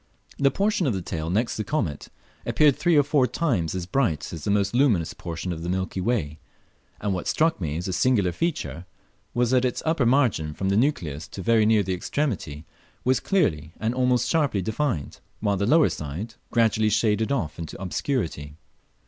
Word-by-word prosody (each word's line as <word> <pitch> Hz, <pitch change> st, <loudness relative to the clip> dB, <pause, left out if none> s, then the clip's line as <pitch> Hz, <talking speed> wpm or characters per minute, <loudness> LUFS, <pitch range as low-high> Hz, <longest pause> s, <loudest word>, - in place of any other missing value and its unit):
The 140 Hz, -1 st, +5 dB
portion 195 Hz, +2 st, +1 dB
of 120 Hz, -, +1 dB
the 95 Hz, -, -2 dB
tail 80 Hz, -1 st, -4 dB
next 110 Hz, +7 st, 0 dB
the 110 Hz, -, -1 dB
comet 90 Hz, -, -2 dB, 0.4 s
appeared 150 Hz, -3 st, +3 dB
three 175 Hz, -3 st, +2 dB
or 145 Hz, -, +6 dB
four 140 Hz, -2 st, +2 dB
tunes 105 Hz, -, -1 dB
as 90 Hz, -2 st, -3 dB
bright 90 Hz, -, -1 dB
as 80 Hz, -3 st, -7 dB
the -, -, -1 dB
most 100 Hz, 0 st, +1 dB
luminous 120 Hz, -, +2 dB
portion 85 Hz, +1 st, -5 dB
of 80 Hz, -, -7 dB
the 85 Hz, -, -4 dB
milky 95 Hz, 0 st, -2 dB
way, 80 Hz, -9 st, -1 dB, 0.6 s
and 100 Hz, -1 st, -1 dB
what 90 Hz, -, -4 dB
struck 160 Hz, -, +1 dB
me 75 Hz, -2 st, -2 dB
as 90 Hz, -, -4 dB
a 95 Hz, -, -2 dB
singular 105 Hz, -5 st, +2 dB
feature 95 Hz, -, -3 dB, 0.5 s
was 120 Hz, 0 st, +2 dB
that 130 Hz, -1 st, +3 dB
its 125 Hz, -2 st, -1 dB
upper 160 Hz, -6 st, +2 dB
margin, 115 Hz, -, +2 dB
from 95 Hz, -, -1 dB
the 100 Hz, -, +2 dB
nucleus 85 Hz, -, 0 dB
to 95 Hz, -, -8 dB
very 115 Hz, -1 st, +4 dB
near 110 Hz, -2 st, +4 dB
the 95 Hz, 0 st, -2 dB
extremity, 90 Hz, -, -3 dB, 0.4 s
was 130 Hz, +1 st, +2 dB
clearly 80 Hz, -, 0 dB
and 110 Hz, +2 st, 0 dB
almost 125 Hz, -1 st, +2 dB
sharply 145 Hz, -, +1 dB
defined, 110 Hz, -, -2 dB, 0.2 s
while 105 Hz, -2 st, +1 dB
the 100 Hz, +2 st, 0 dB
lower 155 Hz, +4 st, +5 dB
side 80 Hz, +10 st, -5 dB, 0.2 s
gradually 110 Hz, -2 st, +2 dB
shaded 110 Hz, +2 st, +1 dB
off 85 Hz, -, -2 dB
into 80 Hz, -, -7 dB
obscurity. 90 Hz, -, -3 dB
105 Hz, 190 wpm, -25 LUFS, 85-130 Hz, 0.6 s, or